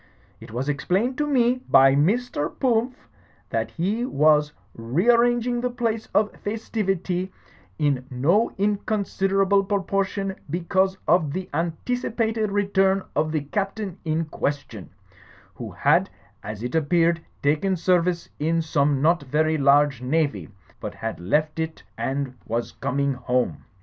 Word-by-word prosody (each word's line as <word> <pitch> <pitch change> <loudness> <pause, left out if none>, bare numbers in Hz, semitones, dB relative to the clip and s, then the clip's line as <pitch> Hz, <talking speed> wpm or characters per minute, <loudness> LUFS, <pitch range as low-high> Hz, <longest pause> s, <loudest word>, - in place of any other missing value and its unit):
It - - -12
was 125 +5 -3
explained 190 - 0
to 295 - +1
me 250 -2 +2
by 135 0 +7
Mr. 170 - +1
Pumph 245 - 0 0.4
that 115 -1 -1
he 200 +8 -1
was 150 - +3 0.2
rearranging 235 - +2
the 250 - 0
place 230 -2 -2
of 210 0 +2
festivity, 195 -4 -2 0.5
in 135 -3 0
no 165 - +2
inconsider 195 -1 0
able 195 +1 +3
proportion 195 0 -1
because 190 +4 0
of 160 -3 +3
the 185 +2 -4
anticipated 220 +6 -1
return 195 -1 +2
of 155 +1 +1
the 155 -1 0
Captain 195 +4 -3
in 160 0 -1
question, 135 - -4 0.6
who - - -7
had, - - +2 0.3
as 105 +1 -7
it 125 - -4
appeared, 165 +1 +2 0.2
taken 155 +7 +2
service 175 0 +1
in 165 +2 +1
some 145 -3 +1
not 170 +1 +3
very 155 +3 0
large 140 -2 +4
Navy, 130 - -1 0.3
but - - -6
had 115 0 -5
left 150 - 0
it 160 0 -4
and 135 -1 -2
was 115 +1 -2
coming 140 +1 -1
home. 125 0 -1
170 Hz, 130 wpm, -24 LUFS, 145-205 Hz, 0.6 s, by